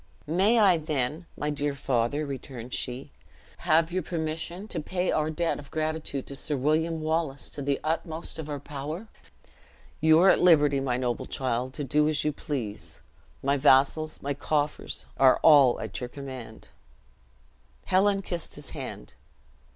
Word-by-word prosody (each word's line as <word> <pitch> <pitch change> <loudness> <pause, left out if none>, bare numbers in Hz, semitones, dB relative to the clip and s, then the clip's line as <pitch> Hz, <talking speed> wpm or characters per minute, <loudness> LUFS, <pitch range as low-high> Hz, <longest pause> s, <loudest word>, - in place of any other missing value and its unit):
"May 190 +9 +3
I, 190 -6 +5
then, 155 +1 -2
my 150 0 -1
dear 145 -1 -1
father," 135 +2 0
returned 130 -3 -7
she, 130 +3 -4 0.5
"have 165 0 +3
your 185 +1 0
permission 165 +4 -3
to - - -2
pay 180 +4 -1
our 155 0 +1
debt 165 +1 -1
of 140 - -11
gratitude 155 -3 -3
to 140 - -7
Sir 145 +1 -3
William 160 +4 +1
Wallace 155 -3 -1
to 145 - -7
the 140 0 0
utmost 160 +1 -2
of 155 -1 -6
our 145 -1 -3
power?" 150 +9 -6 0.9
"You 160 0 +5
are 190 - +7
at - - +2
liberty, 150 -5 +5
my 130 -2 -1
noble 125 -2 -2
child, 130 0 -2
to 145 - -3
do 150 +3 +2
as 155 -2 0
you 150 - 0
please. 125 -8 -5 0.4
My 140 +1 +2
vassals, 145 +3 +3
my 140 +1 -1
coffers, 145 +1 -2
are 130 -1 +6
all 140 -6 +7
at 100 -5 -5
your 125 - -5
command." 130 -5 -9 1.2
Helen 195 +1 +3
kissed 175 -3 -5
his - - -10
hand. - - -7
150 Hz, 160 wpm, -27 LUFS, 135-160 Hz, 1.2 s, are